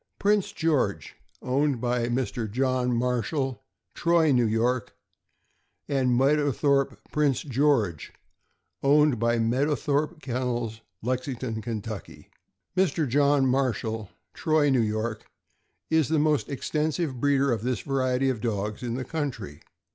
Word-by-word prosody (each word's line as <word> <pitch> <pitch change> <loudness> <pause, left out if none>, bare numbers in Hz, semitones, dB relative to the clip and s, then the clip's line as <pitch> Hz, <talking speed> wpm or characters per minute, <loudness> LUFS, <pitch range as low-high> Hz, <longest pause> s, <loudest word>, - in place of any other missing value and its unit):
Prince 205 -1 +2
George, 130 - 0 0.3
owned 135 0 +1
by 120 0 0
Mr. 120 -2 -2
John 130 +2 0
Marshall, 125 +2 -1 0.3
Troy, 170 -2 +3
N. 120 -5 +3
Y., 120 +3 +2 1.1
and 130 -4 +1
Meadowthorpe 140 -2 +2
Prince 145 -4 +1
George, 130 - +1 0.7
owned 145 -2 +4
by 115 +1 +2
Mead 120 +5 +1
owthorpe 150 +1 -1
Kennels, 120 -4 -3 0.2
Lexington, 125 -2 -3
Ky. 110 -2 -6 0.5
Mr. 175 -5 +1
John 140 +1 +3
Marshall, 115 -5 -1 0.2
Troy, 155 -2 +2
N. 125 -6 +2
Y., 110 +1 -1 0.8
is 160 -3 +3
the 160 - +1
most 150 -1 +1
extensive 150 0 -2
breeder 140 0 +2
of 115 -3 -1
this 125 +1 -1
variety 130 -1 +1
of 115 -5 -5
dogs 105 -2 -2
in 120 -2 -3
the 130 0 -4
country. 120 - -4
130 Hz, 120 wpm, -26 LUFS, 115-145 Hz, 1.1 s, owned